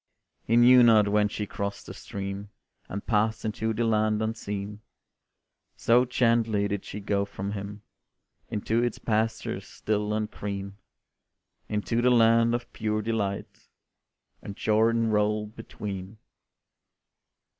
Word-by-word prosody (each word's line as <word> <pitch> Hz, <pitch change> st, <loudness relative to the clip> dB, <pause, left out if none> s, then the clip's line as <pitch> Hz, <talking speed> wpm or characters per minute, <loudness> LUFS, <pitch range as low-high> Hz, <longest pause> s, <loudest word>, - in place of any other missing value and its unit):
He 115 Hz, -, +2 dB
knew 125 Hz, +1 st, +8 dB
not 110 Hz, -3 st, +6 dB
when 105 Hz, 0 st, +3 dB
she 105 Hz, 0 st, -4 dB
crossed 100 Hz, 0 st, -5 dB
the -, -, -8 dB
stream, 100 Hz, +1 st, -6 dB, 0.4 s
And 100 Hz, +1 st, -5 dB
passed 110 Hz, 0 st, +1 dB
into 110 Hz, +1 st, -1 dB
the 110 Hz, +2 st, -1 dB
land 110 Hz, -1 st, +2 dB
unseen, 105 Hz, -2 st, -4 dB, 0.9 s
So 120 Hz, +2 st, +4 dB
gently 115 Hz, -4 st, +2 dB
did 100 Hz, -1 st, -3 dB
she 105 Hz, -, -6 dB
go 100 Hz, 0 st, 0 dB
from 100 Hz, 0 st, -5 dB
him 100 Hz, 0 st, -6 dB, 0.7 s
Into 110 Hz, +1 st, 0 dB
its 120 Hz, -2 st, -1 dB
pastures 110 Hz, 0 st, -2 dB
still 105 Hz, 0 st, -2 dB
and 110 Hz, 0 st, -2 dB
green; 100 Hz, -1 st, -5 dB, 0.9 s
Into 110 Hz, +2 st, 0 dB
the 125 Hz, -, +4 dB
land 115 Hz, -1 st, +4 dB
of 120 Hz, 0 st, -6 dB
pure 110 Hz, -1 st, -1 dB
delight, 105 Hz, -3 st, -3 dB, 0.7 s
And 100 Hz, -, -8 dB
Jordan 115 Hz, +1 st, +2 dB
rolled 105 Hz, 0 st, 0 dB
between. 100 Hz, -2 st, -7 dB
105 Hz, 125 wpm, -27 LUFS, 100-115 Hz, 0.9 s, knew